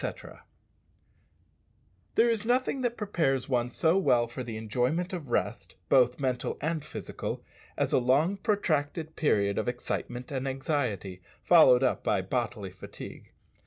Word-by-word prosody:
_ - - -6 1.8
There 230 - +5
is 230 -3 +1
nothing 255 +3 +1
that 240 -1 -1
prepares 165 - 0
one 125 -2 0
so 165 +8 +2
well 120 -10 +3
for 120 +3 -7
the 115 -2 -6
enjoyment 125 - -1
of 160 -8 -5
rest, - - -2
both 125 -1 +4
mental 130 -2 -1
and 160 -1 -2
physical, - - -6 0.3
as - - 0
a - - +5
long 145 +10 +2
protracted 160 -6 -1
period 100 -9 +2
of 110 - -2
excitement 125 +1 -4
and 135 -1 -2
anxiety, 125 - -2 0.2
followed 135 -7 +7
up 130 - +1
by 95 -3 +1
bodily 110 -2 -3
fatigue. 95 - -10
135 Hz, 140 wpm, -29 LUFS, 120-165 Hz, 1.8 s, followed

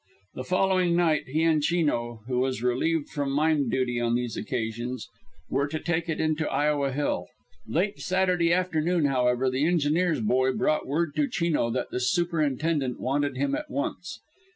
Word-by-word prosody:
The 130 - -5
following 185 0 +2
night 165 -3 +2
he 155 +5 0
and 160 -2 +3
Chino, 145 -9 0
who 125 0 -1
was 130 -2 -1
relieved 145 +5 0
from 145 -2 -2
mine 150 -2 +2
duty 125 0 0
on 120 0 +1
these 120 -2 -2
occasions, 120 0 -4 0.4
were 140 +2 0
to 155 +2 -4
take 170 0 -2
it 160 - -2
in 155 -1 +1
to 160 - -1
Iowa 145 -2 +1
Hill. 145 +2 -1 0.4
Late 180 - -1
Saturday 180 -2 +1
afternoon, 175 -2 +1
however, 125 -1 +2
the 130 +4 +1
engineer's 170 0 +2
boy 130 +4 +2
brought 155 +3 0
word 155 +2 -1
to 285 - +2
Chino 170 - 0
that 125 +2 -3
the - - -2
superintendent 150 -2 0
wanted 145 +2 -1
him 280 -1 0
at 300 0 -3
once. 285 - -4
150 Hz, 170 wpm, -26 LUFS, 130-170 Hz, 0.4 s, and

